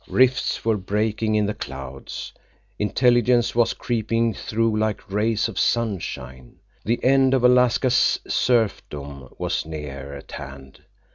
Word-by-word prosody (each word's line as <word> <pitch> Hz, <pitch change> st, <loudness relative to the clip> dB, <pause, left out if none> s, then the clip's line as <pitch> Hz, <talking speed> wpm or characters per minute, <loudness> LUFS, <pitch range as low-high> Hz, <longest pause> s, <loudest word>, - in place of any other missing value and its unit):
Rifts 130 Hz, -2 st, +2 dB
were 110 Hz, -2 st, +2 dB
breaking 105 Hz, +2 st, -1 dB
in 105 Hz, -1 st, +2 dB
the 105 Hz, -, -1 dB
clouds. 65 Hz, -3 st, -7 dB, 0.5 s
Intelligence 120 Hz, +2 st, +3 dB
was 120 Hz, -1 st, +2 dB
creeping 115 Hz, -1 st, 0 dB
through, 115 Hz, +1 st, -1 dB
like 110 Hz, -2 st, -2 dB
rays 110 Hz, +2 st, +1 dB
of 115 Hz, -, -5 dB
sunshine. 75 Hz, -, -2 dB, 0.3 s
The 115 Hz, +2 st, -1 dB
end 135 Hz, 0 st, +4 dB
of 130 Hz, -, 0 dB
Alaska's 125 Hz, 0 st, +4 dB
serfdom 70 Hz, -, -1 dB
was -, -, -1 dB
near 70 Hz, -3 st, -7 dB
at 70 Hz, -, -12 dB
hand. 70 Hz, -2 st, -10 dB
110 Hz, 125 wpm, -23 LUFS, 75-120 Hz, 0.5 s, end